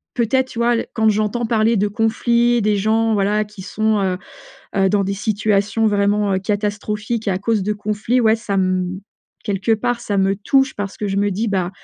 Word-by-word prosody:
Peut-être 255 +2 +1
tu 235 - -10
vois, 240 0 +3
l 230 - -2
quand 220 -1 +2
j'entends 215 +3 0
parler 225 0 +2
de 205 +2 +1
conflits, 235 +3 +1
des 210 0 +2
gens 220 +2 +1
voilà 210 +1 +1
qui 210 -2 -12
sont, 215 +1 0
heu, 185 -1 0 0.6
heu, 195 -1 +3
dans 200 0 +2
des 195 - -2
situations 210 +1 0
vraiment, 205 -1 +1
heu, - - +1
catastrophiques 210 +2 -2
à 190 - +1
cause 215 +1 0
de 210 +2 -1
conflits, 215 +4 -1
ouais 220 -2 +4
ca 220 -3 -4
m 185 -1 0 0.4
quelque 205 +1 0
part 240 +2 0
ça 205 -4 -2
me 195 0 +2
touche 270 +7 +1
parce 205 -1 -5
que 210 - -2
je 195 - -2
me 205 0 +1
dis: 215 +4 -1
«Bah, 185 -3 -1
210 Hz, 205 wpm, -19 LUFS, 200-225 Hz, 0.6 s, ouais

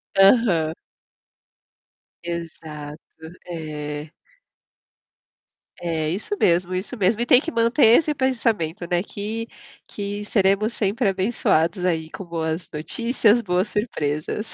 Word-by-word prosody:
Aham. 195 -6 +4 1.5
Exato. 160 -3 -6 0.5
É. 150 -2 -5 1.7
É 160 -3 -1
isso 210 - -3
mesmo, 175 +1 +2
isso 195 +7 -4
mesmo. 210 +4 +2
E - - +1
tem 250 - +6
que 330 +3 -5
manter 230 +3 +3
esse 305 -2 +1
pensamento, 220 - 0
né, 175 +1 +1
que 220 +3 -5 0.4
que 205 0 -5
seremos 205 +2 +2
sempre 210 +2 0
abençoados 185 -3 +1
aí 160 -3 0
com 190 - -8
boas 165 0 -3
notícias, 230 - +2
boas 180 +2 0
surpresas. 210 -1 -2
190 Hz, 105 wpm, -23 LUFS, 160-225 Hz, 1.7 s, tem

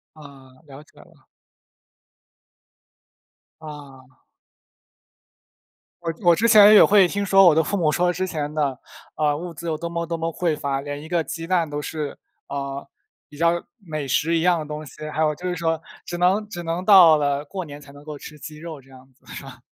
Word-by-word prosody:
啊， 140 -4 -15
了 140 +1 -12
解 - - -22
了。 - - -21 2.3
啊。 135 -4 -13 1.8
我 165 -1 -2
之 175 - -17
我 170 -1 +6
之 230 +7 +1
前， 210 -1 +8
也 - - +9
会 200 -2 +5
听 200 +3 -3
说 195 -1 +5
我 165 - +6
的 160 - +3
父 200 - -2
母 160 -5 +1
说 180 +2 +1
之 185 +2 -3
前 150 -4 -4
的， 145 -4 -1 0.4
呃， 150 -1 0
物 175 +1 -7
资 170 +2 -9
有 155 - -2
多 170 +1 -4
么 170 0 -3
多 165 0 -4
么 165 - -2
匮 165 -3 -1
乏， 140 -2 -2
连 145 0 -6
一 155 - -11
个 170 -2 0
鸡 165 +1 -7
蛋 170 -4 0
都 145 0 -4
是， 150 -1 -5 0.3
呃， 140 0 -5 0.4
比 145 - -15
较 170 +1 +1 0.2
美 155 -8 -6
食 165 +5 +1
一 - - +1
样 175 0 +2
的 155 - -5
东 150 +1 -7
西， 155 +2 -9
还 160 - -2
有 155 -1 +2
就 180 +2 -5
是 180 - -2
说 165 -2 -1 0.2
只 175 - -6
能 195 +4 +1
只 175 -4 -7
能 170 +2 -3
到 180 -6 +8
了 145 0 -1
过 185 +4 -6
年 145 -2 -11
才 140 -1 -15
能 145 0 -15
够 150 -1 -8
吃 150 - -11
鸡 150 +1 -10
肉 160 -3 -9
这 135 - -23
样 130 0 -17
子， 130 - -35
是 - - -8
吧？ 130 -2 -12
155 Hz, 220 characters per minute, -22 LUFS, 145-175 Hz, 2.3 s, 也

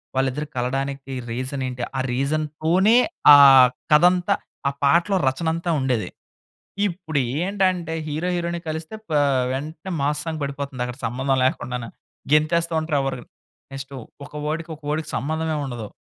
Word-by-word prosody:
వాళ్ళిద్దరు 135 +3 -1
కలవడానికి 135 +2 -3 0.2
రీజన్ 130 +2 -3
ఏంటి? 125 -1 -5
ఆ - - 0
రీజన్‌తోనే 155 - +1 0.4
ఆ - - +9 0.5
కథంతా 175 +3 +4 0.3
ఆ - - -3
పాటలో 170 +7 +3
రచనంతా 165 +5 -1
ఉండేది. 125 -5 -1 0.8
ఇప్పుడు 165 -5 -3 0.2
ఏంటంటే 185 -4 0
హీరో 155 +4 -2
హీరోయిన్‌ని 170 0 -3
కలిస్తే 160 +5 -5
పా 155 -2 +2 0.3
వెంటనే 155 +7 -5
మాస్ 150 +1 0
సాంగ్ 160 -2 -3
పడిపోతుందక్కడ! 140 -3 -4
సంబంధం 130 +3 0
లేకుండానే! 125 -2 -2 0.4
గెంతేస్తా 165 +2 +2
ఉంటారు. 155 -2 -1
ఎవరు 135 -2 -3 0.5
నెక్స్ట్ 135 0 -8 0.3
ఒక 150 - -18
వర్డ్‌కి 160 +2 -3
ఒక 155 - -28
వర్డ్‌కి 155 0 -2
సంబంధమే 155 +5 -2
ఉండదు! 120 -5 -6
150 Hz, 125 wpm, -22 LUFS, 135-165 Hz, 0.8 s, ఆ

